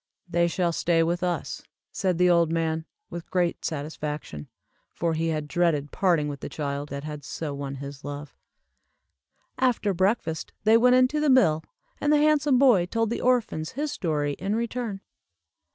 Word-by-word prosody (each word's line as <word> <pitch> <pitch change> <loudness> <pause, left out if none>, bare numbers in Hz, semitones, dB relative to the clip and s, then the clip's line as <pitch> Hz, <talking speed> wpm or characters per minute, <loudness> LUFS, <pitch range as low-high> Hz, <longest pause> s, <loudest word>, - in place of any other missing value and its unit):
"They 170 0 +2
shall 170 0 0
stay 165 0 +2
with 175 +2 -1
us," 175 -4 -2 0.3
said 185 -3 0
the 180 +1 +4
old 170 -2 +4
man, 160 -1 -1 0.3
with 170 -1 -7
great 175 -2 0
satisfaction, 150 - -5 0.4
for 170 -1 -1
he 160 +1 -1
had 155 -2 -2
dreaded 150 -3 +1
parting 170 -6 +2
with 145 -1 -5
the - - -6
child 145 -1 -4
that 140 0 -5
had 150 -1 -6
so 150 +1 -5
won 140 -1 -5
his 140 +1 -8
love. 145 0 -7 1.2
After 245 -6 +2
breakfast 185 -3 -1
they 220 +1 +5
went 250 +2 +5
into 255 +4 +3
the 300 -1 +2
mill, 165 -13 +4 0.4
and 295 - +1
the 300 - +5
handsome 295 -2 +3
boy 240 -10 +5
told 225 +3 -1
the - - -2
orphans 235 -11 0
his 295 +3 -2
story, 150 - -1
in 200 +2 -1
return. 230 -3 -3
170 Hz, 170 wpm, -26 LUFS, 150-225 Hz, 1.2 s, they